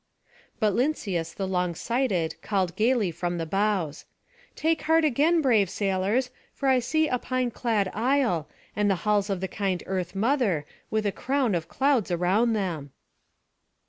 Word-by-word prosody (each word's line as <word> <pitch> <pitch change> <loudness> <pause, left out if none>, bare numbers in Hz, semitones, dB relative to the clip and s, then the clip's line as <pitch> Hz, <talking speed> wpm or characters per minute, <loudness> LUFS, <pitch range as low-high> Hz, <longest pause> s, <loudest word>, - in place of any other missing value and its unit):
But 215 -3 +2
Lynceus 195 - -1
the 195 - -3
long 180 -2 -1
sighted 225 -8 -1
called 190 -4 -1
gayly 220 -3 +2
from 175 +1 -3
the 165 - -2
bows: 195 -4 -1 0.5
"Take 320 +1 0
heart 325 0 +5
again, 310 +4 +3
brave 220 -8 +3
sailors; 200 +7 0 0.2
for 275 - -2
I 260 -1 +4
see 315 +6 +1
a 250 -3 0
pine 255 -1 -1
clad 215 -5 0
isle, 230 - +1 0.3
and 210 0 +2
the 195 - +3
halls 205 -1 +2
of 195 -2 -2
the 190 - -1
kind 190 -2 -2
Earth 185 -1 -3
mother, 210 - +1 0.2
with 220 -1 -1
a 205 - +2
crown 260 0 0
of 170 -2 -2
clouds 270 -7 +1
around 185 +7 +2
them." 170 -9 -3
205 Hz, 160 wpm, -26 LUFS, 185-255 Hz, 0.5 s, heart